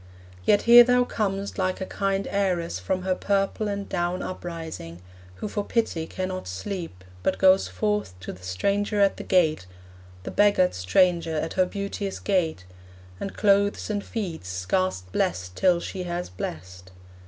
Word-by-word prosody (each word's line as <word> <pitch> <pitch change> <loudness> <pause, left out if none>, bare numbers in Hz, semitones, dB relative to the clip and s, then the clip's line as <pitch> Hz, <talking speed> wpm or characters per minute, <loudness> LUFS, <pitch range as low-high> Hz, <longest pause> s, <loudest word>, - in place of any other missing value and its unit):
Yet 205 - +4
here 240 +1 +10
thou 250 0 +4
comest 200 -4 -2
Like 185 0 0
a 190 - -3
kind 195 0 -1
heiress 180 - 0
from 180 - -2
her 185 0 +1
purple 200 +3 0
and 200 -1 -3
down 175 +1 -1
Uprising, 160 - -6 0.4
who 210 - -5
for 205 0 -2
pity 200 -8 -1
cannot 185 - -4
sleep, 95 - -5 0.2
But 190 - 0
goes 190 0 +5
forth 210 - -2
to - - -6
the 90 - -14
stranger 200 - -1
at 200 -1 +3
her - - -5
gate 160 - +2 0.6
The - - -5
beggared 205 -3 +4
stranger 165 - +2
at 160 +1 -2
her 185 -1 +2
beauteous 200 0 -4
gate 165 - 0 0.5
And 195 - -5
clothes 200 +1 +2
and 205 -1 -2
feeds; 175 - -5
scarce 95 0 -1
blest 90 0 -2
till 180 - +3
she 185 +2 -5
has 175 - -4
blest. 90 +1 -7
185 Hz, 155 wpm, -25 LUFS, -, 0.6 s, here